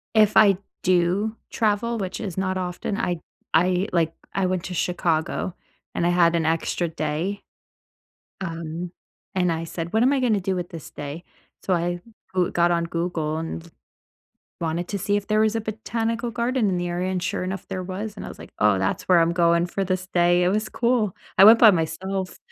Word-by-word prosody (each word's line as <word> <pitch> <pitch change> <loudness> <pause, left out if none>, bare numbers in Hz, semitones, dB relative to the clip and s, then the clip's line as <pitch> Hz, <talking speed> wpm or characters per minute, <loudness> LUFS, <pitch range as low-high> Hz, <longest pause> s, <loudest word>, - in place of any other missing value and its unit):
If 215 -1 +5
I 200 -3 +6 0.2
do 185 +5 +2
travel, 225 +1 0
which 190 -2 -4
is 195 -5 -5
not 190 0 -1
often, 180 +2 -3
I 175 -6 -1 0.3
I, 180 +4 +3
like, 165 -2 +1 0.2
I 195 -1 +1
went 185 -2 -1
to 180 - -5
Chicago, 170 0 -1 0.4
and 170 - 0
I - - +3
had 170 -1 +4
an 165 -2 +1
extra 165 +1 0
day. 160 +5 -3 1.0
Um, 170 -1 -5 0.4
and 180 -2 +2
I 165 0 -3
said, 165 0 -5
"What 220 - +3
am 260 +3 +4
I 270 - +1
gonna 220 -5 +2
do 190 +1 -1
with 175 -1 -4
this 165 -3 -9
day?" 145 +4 -7 0.4
So 185 - +1
I 175 +1 -1 0.3
Goo 185 0 +2
got 175 0 +2
on 170 -1 +1
Google 165 -2 -2
and 165 +1 -6 0.9
wanted 170 +2 -2
to 200 - -2
see 205 +2 +1
if 205 -1 -3
there 215 0 +2
was 220 0 +3
a - - 0
botanical 225 +2 -2
garden 235 -1 0
in 180 - 0
the 175 0 -2
area, 180 +2 -1
and 180 -1 -2
sure 180 - -2
enough, 190 0 -4
there 185 -1 -3
was. 200 +3 -5
And - - -7
I - - -6
was - - -10
like, - - -11
"Oh, 105 -2 +4
that's 95 +1 -1
where 180 -2 +5
I'm 165 +1 +3
going 170 0 +3
for 195 +2 -2
this 185 0 -2
day." 175 0 +3
It - - +3
was 215 +3 0
cool. 235 -5 +1 0.2
I 195 - +10
went 225 +2 +9
by 220 -3 +9
myself. 185 +3 -2
180 Hz, 200 wpm, -24 LUFS, 170-205 Hz, 1.0 s, I